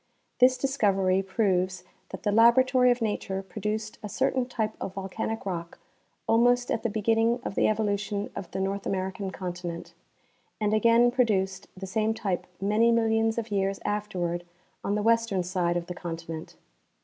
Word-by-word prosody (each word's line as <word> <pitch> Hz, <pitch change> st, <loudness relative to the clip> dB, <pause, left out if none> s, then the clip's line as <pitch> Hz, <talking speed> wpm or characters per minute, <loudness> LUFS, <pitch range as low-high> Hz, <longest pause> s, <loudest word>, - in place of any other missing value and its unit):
This 255 Hz, +1 st, +6 dB
discovery 195 Hz, -8 st, +2 dB
proves 185 Hz, -2 st, 0 dB, 0.3 s
that 190 Hz, -, -8 dB
the 205 Hz, -, +1 dB
laboratory 250 Hz, +3 st, +5 dB
of 245 Hz, -1 st, +2 dB
nature 195 Hz, -3 st, -2 dB
produced 210 Hz, +3 st, -4 dB
a 210 Hz, -, -6 dB
certain 260 Hz, +3 st, 0 dB
type 220 Hz, -3 st, -2 dB
of 190 Hz, -, -5 dB
volcanic 200 Hz, +3 st, -4 dB
rock 170 Hz, -3 st, -4 dB, 0.5 s
almost 245 Hz, +2 st, +3 dB
at 230 Hz, -, 0 dB
the 230 Hz, -, -1 dB
beginning 225 Hz, +3 st, +2 dB
of -, -, -4 dB
the -, -, +2 dB
evolution 205 Hz, -1 st, -1 dB
of 180 Hz, -, -6 dB
the 190 Hz, -, -4 dB
North 195 Hz, +1 st, -2 dB
American 190 Hz, +1 st, -2 dB
continent, 175 Hz, -2 st, -6 dB, 0.7 s
and 210 Hz, -1 st, +1 dB
again 230 Hz, +2 st, +5 dB
produced 195 Hz, -6 st, 0 dB
the 190 Hz, -, -6 dB
same 215 Hz, +3 st, 0 dB
tjq^e 195 Hz, -5 st, -2 dB
many 215 Hz, +4 st, +3 dB
millions 225 Hz, -1 st, +2 dB
of 230 Hz, -1 st, -3 dB
year.'^ 195 Hz, -1 st, 0 dB
afterward 180 Hz, -5 st, -2 dB, 0.4 s
on 200 Hz, -, 0 dB
the 210 Hz, -, -1 dB
western 230 Hz, -4 st, +2 dB
side 175 Hz, -1 st, 0 dB
of 170 Hz, -, -3 dB
the 180 Hz, -, -5 dB
continent. 165 Hz, -2 st, -7 dB
205 Hz, 160 wpm, -27 LUFS, 190-225 Hz, 0.7 s, This